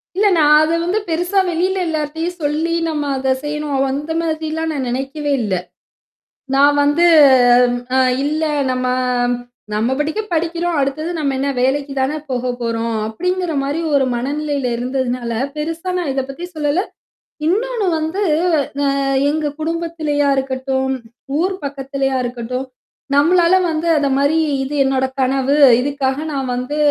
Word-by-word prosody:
இல்ல 415 +2 +3
நான் 300 -1 +5
அத 325 +2 +1
வந்து 370 +5 0
பெருசா 355 +4 +1
வெளியில 370 +3 0
எல்லார்ட்டயும் 320 +3 -3
சொல்லி 310 +3 0 0.2
நம்ம 300 -2 -2
அத 265 0 +1
செய்யணும். 295 -2 -1
அந்த 295 +3 -4
மாதிரிலாம் 320 0 -2
நான் 265 -4 -3
நெனைக்கவே 275 +4 -3
இல்ல. 205 -3 -2 1.0
நான் 285 +1 +5
வந்து 295 +4 +3 0.9
அ - - +4 0.3
இல்ல 305 +2 -1 0.3
நம்ம 255 0 -2 0.9
நம்ம 220 +4 0
படிக்கு 315 +9 -1
படிக்கிறோம். 340 +1 -1
அடுத்தது 285 +4 -2
நம்ம 280 -2 0
என்ன 280 +1 0
வேலைக்கு 275 +2 0
தானே 265 +3 0
போக 255 -1 -2
போறோம். 230 -1 -1
அப்படிங்கிற 360 +9 -2
மாரி 285 +4 -2 0.2
ஒரு 270 -1 +3
மனநிலையில 280 +1 -2
இருந்ததுனால, 250 -1 -2 0.2
பெருசா 330 +4 -4
நான் 340 -6 -1
இத 270 - 0
பத்தி 335 +6 -6
சொல்லல. 300 +3 +1 0.7
இன்னொன்னு 450 +4 0
வந்து 320 +6 -2 0.6
அ - - +2 0.4
எங்க 310 0 -1
குடும்பத்திலயா 315 -3 -1
இருக்கட்டும், 265 0 -1 0.4
ஊர் 375 +3 0
பக்கத்துலயா 275 -1 -2
இருக்கட்டும். 250 +2 -4 0.5
நம்மளால 340 +4 +4 0.2
வந்து 315 +1 -2
அத 290 -1 +1
மாரி 285 +3 +2 0.3
இது 275 +2 -4
என்னோட 265 -1 +1 0.2
கனவு. 270 +2 +1 0.2
இதுக்காக 270 -1 -1 0.2
நான் 265 -2 -2
வந்து 255 +4 -3
290 Hz, 135 wpm, -18 LUFS, 265-325 Hz, 1.0 s, நான்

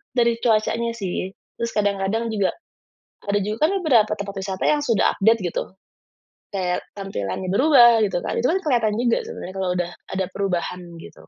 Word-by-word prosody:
Dari 235 -1 +3
cuacanya 230 +1 +1
sih. 190 -2 -3 0.3
Terus 235 0 -2
kadang-kadang 205 +2 0
juga, 200 -3 +1 0.8
ada 205 - +2
juga 210 +2 -2
kan - - -1
beberapa 225 -8 +4
tempat 200 -1 -6
wisata 190 -1 -4
yang 300 -1 +3
sudah 230 -6 +2
update, 225 +3 +4
gitu. - - -3 0.8
Kayak 180 -2 -1 0.2
tampilannya 185 - -4
berubah 240 -3 +6
gitu 180 -2 -2
kan, - - -2
itu 245 - +2
kan 375 +3 +2
kelihatan 230 -7 +2
juga 235 -1 +2
sebenarnya 185 - -7
kalau 190 -1 -1
udah 175 0 -2 0.2
ada 190 - 0
perubahan, 180 -2 -2 0.2
gitu. 165 - -13
210 Hz, 165 wpm, -22 LUFS, 190-235 Hz, 0.8 s, berubah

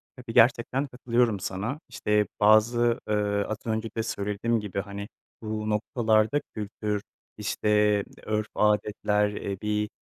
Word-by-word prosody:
Tabii, 125 -3 -8
gerçekten 125 +4 +3
katılıyorum 120 -4 +1
sana. 100 +10 -3
İşte, 105 -1 +1
bazı, 115 +3 +4
ııı, 105 -1 +1
az 110 - -3
önce 110 0 -1
de 115 - +1
söylediğim 110 +1 -1
gibi, 105 -2 -4
hani, 100 0 -7 0.3
bu 110 -1 -3
noktalarda 110 +4 +2
kültür, 105 0 -3 0.4
işte 105 0 +2 0.2
örf, 110 0 -1
adetler, 105 0 +2
eee, 100 -1 -4
bir, 105 0 -1
105 Hz, 125 wpm, -27 LUFS, 105-115 Hz, 0.4 s, bazı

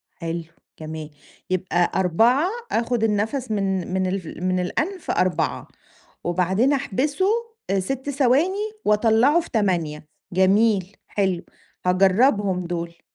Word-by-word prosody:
حلو. 165 0 -4 0.4
جميل. 155 -1 -6 0.4
يبقى 180 -1 +1
4 225 - +3 0.2
آخُد 230 0 0
النفس 220 +4 0
من 190 -3 -1
من 190 0 +1
الف 185 -1 -3
من 185 +1 -2
الأنف 325 - -2
4 180 -3 0 0.6
وبعدين 185 +10 +2
أحبسه، 285 - 0 0.5
6 265 +8 -3
ثواني، 310 - +1
وأطلعه 225 +8 +4
في 340 - -6
8 170 - -1 0.3
جميل. 195 +1 +2
حلو. 190 -4 0 0.4
هاجربهم 190 0 +3
دول. 170 -1 -5
195 Hz, 105 wpm, -23 LUFS, 180-250 Hz, 0.6 s, وأطلعه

